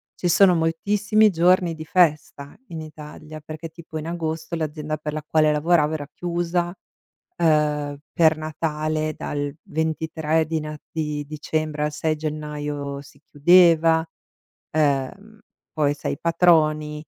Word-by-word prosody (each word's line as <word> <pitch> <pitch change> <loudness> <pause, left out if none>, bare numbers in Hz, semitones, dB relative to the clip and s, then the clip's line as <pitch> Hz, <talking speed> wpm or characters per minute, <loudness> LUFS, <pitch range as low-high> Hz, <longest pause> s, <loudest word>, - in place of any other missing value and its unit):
Ci 180 - -2
sono 185 +2 +6
moltissimi 205 +6 +2
giorni 175 0 +3
di 160 0 -8
festa 150 -4 +1
in 165 -2 -6
Italia, 155 0 -10
perché 155 +2 -8
tipo 160 -1 -9
in 155 +1 -5
agosto 165 0 -3
l'azienda 155 -1 -3
per 150 0 -5
la 155 0 -4
quale 155 -1 +3
lavoravo 155 0 +2
era 145 -2 -4
chiusa, 175 0 -2 0.7
uhm, 150 -3 +1
per 160 -2 +4
Natale 155 0 -2
dal 145 -1 -3
23 160 0 -1
di 160 0 -2
Nat 150 0 -7
di 150 -2 -3
dicembre 155 0 -3
al 150 - -1
6 155 +1 -1
gennaio 150 -2 -4
si 140 0 -18
chiudeva, 165 +1 +5 0.6
ehm, 155 +9 -1 0.3
poi 150 -2 +1
sai 140 - -4
patroni, 155 -3 +2
155 Hz, 130 wpm, -23 LUFS, 150-165 Hz, 0.7 s, sono